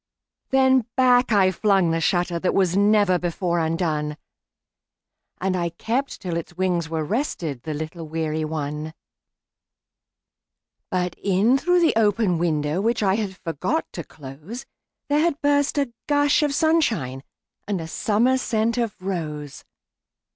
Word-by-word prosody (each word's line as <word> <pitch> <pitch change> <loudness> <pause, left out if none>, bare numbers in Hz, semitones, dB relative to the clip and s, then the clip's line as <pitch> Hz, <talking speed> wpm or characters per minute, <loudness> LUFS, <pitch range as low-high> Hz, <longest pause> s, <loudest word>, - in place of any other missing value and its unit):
Then 260 -3 +3
back 250 -1 +4
I 195 -3 +4
flung 190 -3 +2
the 165 - 0
shutterThat 175 0 0
was 185 -2 +2
never 205 -2 +4
before 175 0 -1
undone, 160 -2 -1 1.2
And 190 0 0
I 170 -1 -1
kept 235 +11 -3
till 175 -3 -3
its 170 +1 -7
wings 180 -3 0
were 160 -1 -2
restedThe 155 - -3
little 160 +1 -6
weary 155 0 -2
one. 155 0 -4 1.9
But 180 -1 -1
in 200 +6 +3
through 355 +6 +2
the 335 - +4
open 205 -5 +2
window, 155 0 0
Which 230 +1 0
I 190 -1 +3
had 200 -3 -2
forgot 170 - -2
to 170 - -5
close, 155 - -10 0.4
There 290 +1 +2
had 320 -2 +1
burst 285 -1 +1
a 275 -4 0
gush 290 0 +3
of 295 - +2
sunshineAnd 260 - +1 0.5
a 185 -6 -2
summer 230 +9 +1
scent 230 0 0
of 230 -4 -2
rose. 155 -6 -5
185 Hz, 135 wpm, -23 LUFS, 165-240 Hz, 1.9 s, back